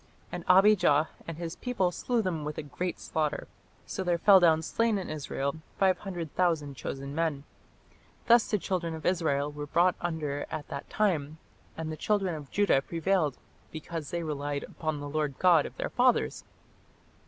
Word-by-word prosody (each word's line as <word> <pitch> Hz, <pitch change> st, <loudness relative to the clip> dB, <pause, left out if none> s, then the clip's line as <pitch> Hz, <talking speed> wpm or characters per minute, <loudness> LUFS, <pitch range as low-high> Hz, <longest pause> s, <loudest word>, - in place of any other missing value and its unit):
And -, -, -5 dB
Abijah 180 Hz, -6 st, +5 dB, 0.2 s
and 165 Hz, -2 st, -5 dB
his 170 Hz, -1 st, -5 dB
people 200 Hz, -8 st, 0 dB
slew 235 Hz, +5 st, -1 dB
them 170 Hz, -5 st, -2 dB
with 150 Hz, 0 st, -5 dB
a -, -, -3 dB
great 170 Hz, +6 st, -4 dB
slaughter: 155 Hz, -2 st, -2 dB, 0.4 s
so 190 Hz, -, -4 dB
there 175 Hz, -2 st, +1 dB
fell 195 Hz, +3 st, +7 dB
down 160 Hz, -2 st, +4 dB
slain 230 Hz, +4 st, +1 dB
in 190 Hz, -, -4 dB
Israel 140 Hz, -1 st, -3 dB, 0.2 s
five 190 Hz, -1 st, +3 dB
hundred 175 Hz, -6 st, -6 dB
thousand 160 Hz, -6 st, +1 dB
chosen 140 Hz, +2 st, -5 dB
men. 155 Hz, -3 st, -1 dB, 0.8 s
Thus 235 Hz, -1 st, +5 dB
the 210 Hz, -, +2 dB
children 175 Hz, -4 st, -2 dB
of 160 Hz, -, -9 dB
Israel 150 Hz, -5 st, +1 dB
were 145 Hz, 0 st, -6 dB
brought 175 Hz, +4 st, +3 dB
under 155 Hz, -4 st, -2 dB
at 150 Hz, -, -5 dB
that 140 Hz, -, -6 dB
time, 160 Hz, -8 st, 0 dB, 0.4 s
and 160 Hz, -1 st, -4 dB
the 155 Hz, -, -5 dB
children 195 Hz, +1 st, 0 dB
of 150 Hz, -3 st, -7 dB
Judah 200 Hz, -9 st, +3 dB
prevailed, 165 Hz, -2 st, 0 dB, 0.3 s
because 160 Hz, -1 st, -6 dB
they 170 Hz, -1 st, -2 dB
relied 145 Hz, -2 st, -3 dB
upon 155 Hz, -2 st, -4 dB
the 145 Hz, -, -5 dB
Lord 150 Hz, -2 st, -2 dB
God 175 Hz, -5 st, +5 dB
of -, -, -14 dB
their -, -, -3 dB
fathers. 250 Hz, 0 st, +2 dB
165 Hz, 175 wpm, -29 LUFS, 150-185 Hz, 0.8 s, fell